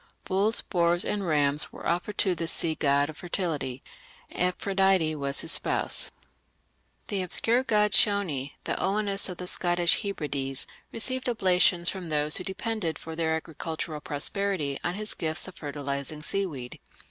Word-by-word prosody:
Bulls, 200 +4 +3
boars, 175 -1 +2
and 200 -3 -2
rams 145 -2 +2
were - - -10
offered 180 +5 -1
to 190 - +3
this 165 -1 -1
sea 165 -2 +1
god 140 -2 +2
of 155 0 -9
fertility. 160 -8 -3 0.5
Amphitrite 180 -3 +1
was 140 0 +1
his - - -2
spouse. - - +2 1.0
An 200 -3 0
obscure 225 +7 +3
god 210 -5 +2
Shony, 180 -11 +2
the - - -1
Oannes 200 0 +3
of 180 - -6
the 180 - -5
Scottish 175 -1 +2
Hebrides, 145 - -2 0.3
received 255 +2 +2
oblations 180 -5 +3
from 185 -3 -2
those 150 0 +2
who - - -5
depended 190 -4 -3
for 160 0 -8
their 160 -1 0
agricultural 160 -1 -5
prosperity 150 -1 -2
on 175 - -1
his 210 +1 -1
gifts 160 +2 -2
of 185 - -9
fertilizing 145 0 -4
seaweed. 150 -11 -4
175 Hz, 145 wpm, -27 LUFS, 150-195 Hz, 1.0 s, Bulls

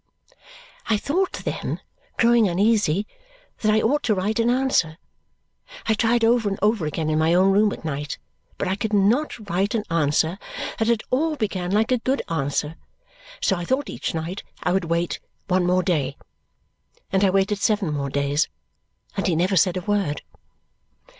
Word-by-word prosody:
I 220 - +3
thought 360 - 0
then, - - -3 0.4
growing 235 -2 +5
uneasy, 200 -1 +2 0.5
that 215 - +2
I 215 0 +3
ought 290 +6 +2
to 215 - +2
write 205 +4 -1
an 230 +1 +3
answer. 245 -11 +1 0.9
I 220 - +3
tried 230 +2 +2
over 230 -2 +3
and 195 - -3
over 210 -5 +1
again 155 +1 -2
in 155 - +1
my 160 +2 +3
own 190 +2 +5
room 205 +1 +4
at - - -7
night, 145 -1 -3 0.4
but - - -2
I 190 - 0
could 215 +1 -3
not 215 +9 +2
write 195 +4 0
an 215 - 0
answer 160 +3 +1 0.4
that 225 0 +1
at 230 -2 +2
all 305 +5 +1
began 195 -8 -2
like 220 +4 +2
a 250 - +3
good 265 +4 0
answer, 150 0 -1 0.7
so 195 - +3
I 175 - -4
thought 260 +10 -1
each - - -4
night 165 +5 -4 0.2
I 180 - +1
would 190 -1 +1
wait 170 +1 -1 0.3
one 185 -2 +2
more 180 +1 +3
day. 145 -7 0 0.9
And 195 +1 +2
I 195 - +5
waited 195 +2 +1
seven 200 -6 +1
more 140 -1 -2
days, 140 +2 0 0.7
and 195 - -1
he 175 - +2
never 185 +4 +1
said 180 +1 +3
a - - -2
word. 195 -6 -1
195 Hz, 175 wpm, -23 LUFS, 165-220 Hz, 0.9 s, growing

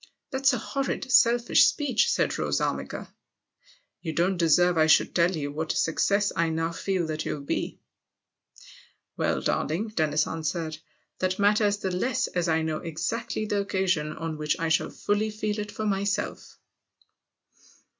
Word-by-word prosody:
" - - -57
That's 270 0 +3
a 250 - 0
horrid, 270 +2 -3
selfish 240 -2 +5
speech," 275 -7 +1
said - - 0
Rose - - 0
Armiger. - - -3 0.9
"You 160 -2 -4
don't 175 +4 +1
deserve 175 +1 +4
I 160 -1 +4
should 160 - +4
tell 175 +1 +3
you 145 -1 -3
what 155 +2 -2
a - - -3
success 200 +5 +1
I 165 0 +1
now 165 +1 -1
feel 180 +1 -1
that 155 -1 -3
you'll 150 - -4
be." - - -3 0.7
" - - -22
Well, - - 0
darling," 180 +9 -1
Dennis 155 -6 +1
answered, 160 0 -3 0.2
" - - -46
that 185 0 0
matters 205 0 +3
the 190 -2 -3
less 255 +6 0
as 175 -1 -1
I 160 0 +2
know 160 -1 -1
exactly 215 +7 -3
the 205 -1 0
occasion 185 -6 0
on 160 -1 -5
which 150 0 -1
I 165 0 0
shall 160 - +2
fully 210 +1 -1
feel 215 0 -3
it 210 0 -4
for 215 +1 -4
myself." 200 0 -2
185 Hz, 165 wpm, -26 LUFS, 160-210 Hz, 0.9 s, selfish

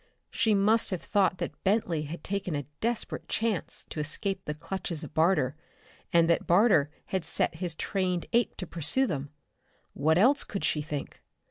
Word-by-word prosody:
She 220 -5 +2
must 215 +3 +3
have 185 -3 -3
thought 190 -3 +2
that - - -6
Bentley 190 -5 +1
had 160 +4 -7
taken 195 -4 -2
a 145 -1 -3
desperate 235 0 -1
chance 220 -5 -1
to - - -4
escape 190 +5 -2
the 150 - -3
clutches 165 0 -4
of - - -9
Barter, 160 -5 +2 0.6
and 170 -1 +5
that 170 - +1
Barter 175 -6 +5 0.2
had 190 -3 -2
set 165 0 0
his 175 -3 -1
trained 180 -1 -1
ape 235 0 +2
to 185 - -4
pursue 170 - 0
them. 145 - -3 0.6
What 155 +4 +2
else 255 +9 +5
could 200 - -5
she 150 - +1
think? 150 -1 -6
180 Hz, 170 wpm, -29 LUFS, 155-200 Hz, 0.6 s, and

